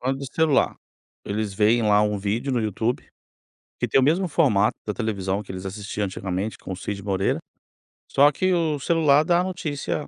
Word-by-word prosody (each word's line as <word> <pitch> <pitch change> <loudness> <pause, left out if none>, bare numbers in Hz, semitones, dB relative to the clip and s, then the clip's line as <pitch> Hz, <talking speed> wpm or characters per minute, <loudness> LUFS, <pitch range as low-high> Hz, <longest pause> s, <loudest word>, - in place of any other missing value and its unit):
falando 135 +1 -1
do 140 - -6
celular. 160 -4 +2 0.5
Eles 105 -1 -3
veem 110 +4 +3
lá 105 -1 +4
um 105 -1 0
vídeo 110 +7 -2
no 125 - +1
YouTube, 110 +3 -1 0.8
que - - 0
tem - - +3
o 130 - +3
mesmo 170 +6 +2
formato 130 -11 +2
da 105 - -2
televisão 100 -4 -2
que 95 - -9
eles 95 0 -7
assistiam 100 +1 -4
antigamente 95 +2 -4
com - - -9
o - - -7
Cid 100 +1 -5
Moreira, 95 -1 0 0.7
só 145 +2 +5
que 185 +5 0
o 160 -4 0
celular 150 -1 +3
dá 170 +2 +3
a - - 0
notícia, 155 -5 -3
110 Hz, 190 wpm, -24 LUFS, 100-145 Hz, 0.8 s, só